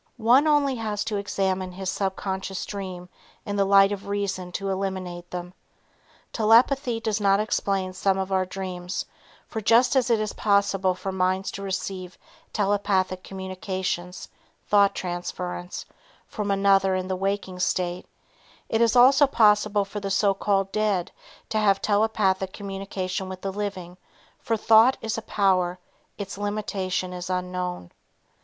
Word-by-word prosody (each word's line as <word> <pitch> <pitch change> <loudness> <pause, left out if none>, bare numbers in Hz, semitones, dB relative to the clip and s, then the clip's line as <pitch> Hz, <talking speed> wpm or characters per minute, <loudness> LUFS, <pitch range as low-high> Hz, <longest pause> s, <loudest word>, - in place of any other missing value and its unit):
One 245 +6 +4
only 290 -2 +3
has 210 -2 -2
to 220 -2 -2
examine 190 -2 -1
his 190 +1 -6
subconscious 190 0 -3
dream 185 -3 -6 0.4
in 205 - -3
the 200 -1 +2
light 195 0 +6
of 200 -1 -5
reason 195 -3 -3
to 195 +2 -3
eliminate 185 -2 -4
them. 180 0 -6 0.8
Telepathy 235 +2 +3
does 220 -2 -1
explain 195 -2 +1
some 190 +1 +1
of 190 0 -3
our 190 -1 +2
dreams, 185 -1 -5 0.4
for 220 - -4
just 235 +5 +4
as 255 -1 +2
it 230 -2 +3
is 215 -1 -2
possible 200 -2 +2
for 195 +1 -4
minds 185 +1 0
to 200 - -7
receive 185 -1 -4 0.3
telepathic 195 -2 0
communications 185 -1 -4 0.4
(thought 200 -1 +4
transference) 180 0 -5 0.4
from 210 -2 -4
another 195 -1 +3
in 185 0 -2
the 190 - -1
walking 195 -1 -2
state, 180 0 -1 0.6
it 225 - +1
is 230 +1 +3
also 270 +4 +7
possible 210 -4 +3
for 205 +1 -6
the 200 -1 -4
so 195 +1 +3
called 195 0 0
dead 210 -5 0 0.4
to 215 - 0
have 200 -2 +3
telepathic 205 -3 +1
communication 195 -1 -4
with 185 0 -7
the 195 -1 -3
living, 190 -3 -5 0.4
for 225 - -1
thought 225 +4 +5
is 225 0 -2
a - - -9
power, 185 -4 +1 0.4
its 200 -1 -6
limitation 195 -3 -2
is 180 0 -6
unknown. 180 - -3
195 Hz, 145 wpm, -25 LUFS, 185-210 Hz, 0.8 s, also